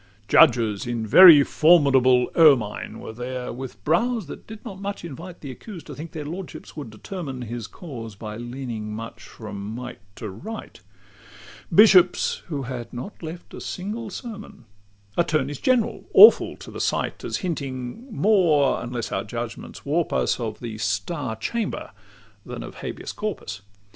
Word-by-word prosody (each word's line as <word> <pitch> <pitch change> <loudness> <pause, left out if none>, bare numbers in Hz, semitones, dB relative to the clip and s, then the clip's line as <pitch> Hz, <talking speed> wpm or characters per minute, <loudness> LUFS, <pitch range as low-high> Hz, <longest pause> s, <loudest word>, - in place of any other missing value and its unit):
LXIX - - -33
Judges 115 -7 +4
in 120 -2 -2
very 155 - +10
formidable 135 -6 +4
ermine 135 -11 +3
Were 110 - -8
there, 125 +1 -5
with 120 -5 -8
brows 225 - +1
that 145 - -10
did 220 +1 -11
not 195 -4 -8
much 200 -3 -5
invite 170 +3 -9
The 140 - -6
accused 180 - -10
to 150 - -8
think 155 +4 -8
their 150 -2 -6
lordships 175 +4 -8
would 145 -7 -7
determine 130 - -6
His 115 -1 -6
cause 115 - -9
by 105 +1 -7
leaning 120 -3 -6
much 115 +1 -8
from 105 -3 -9
might 120 0 -7 0.2
to 110 - -6
right: 215 - -8 0.9
Bishops, 185 -1 +5
who 145 -5 -3
had 120 -2 -6
not 125 +12 -8
left 170 +1 -8
a - - -8
single 210 +4 -5
sermon: 210 - -9 0.5
Attorneys 145 -5 0
general, 250 -4 +1
awful 435 - +8
to - - -11
the - - -5
sight, - - -1
As - - -2
hinting 140 - -5
more 175 -11 +3
(unless 120 -1 -4
our - - -1
judgments 115 +1 -7
warp 155 +4 0
us) - - +1
Of 110 -3 -4
the 115 -3 -6
"Star 110 - -2
Chamber" 220 - -3 0.5
than - - -7
of - - -10
"Habeas - - -6
Corpus." 175 - -5
135 Hz, 155 wpm, -24 LUFS, 120-175 Hz, 0.9 s, very